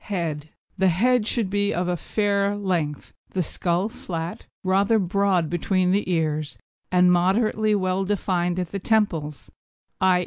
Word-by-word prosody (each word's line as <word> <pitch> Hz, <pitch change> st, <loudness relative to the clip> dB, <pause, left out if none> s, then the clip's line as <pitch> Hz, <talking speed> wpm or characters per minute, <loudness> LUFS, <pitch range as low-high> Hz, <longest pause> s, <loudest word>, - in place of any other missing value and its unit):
HEAD 160 Hz, -6 st, -3 dB, 0.3 s
The 190 Hz, -, +4 dB
head 225 Hz, +6 st, +2 dB
should 230 Hz, -4 st, 0 dB
be 205 Hz, 0 st, 0 dB
of 175 Hz, +1 st, -1 dB
a 180 Hz, -, 0 dB
fair 200 Hz, +2 st, 0 dB
length; 175 Hz, -8 st, -2 dB, 0.2 s
the 185 Hz, -, 0 dB
skull 175 Hz, +4 st, -1 dB
flat, 170 Hz, -6 st, -6 dB, 0.2 s
rather 195 Hz, +4 st, +3 dB
broad 195 Hz, -3 st, +1 dB
between 180 Hz, +2 st, +1 dB
the 200 Hz, 0 st, 0 dB
ears, 155 Hz, -3 st, -1 dB, 0.3 s
and 180 Hz, 0 st, +5 dB
moderately 210 Hz, +4 st, +2 dB
well 185 Hz, -1 st, 0 dB
defined 180 Hz, -3 st, -1 dB
at 180 Hz, -2 st, -3 dB
the 200 Hz, -, -3 dB
temples 175 Hz, -9 st, -1 dB, 0.5 s
_i. 185 Hz, -1 st, +4 dB
185 Hz, 145 wpm, -24 LUFS, 175-205 Hz, 0.5 s, and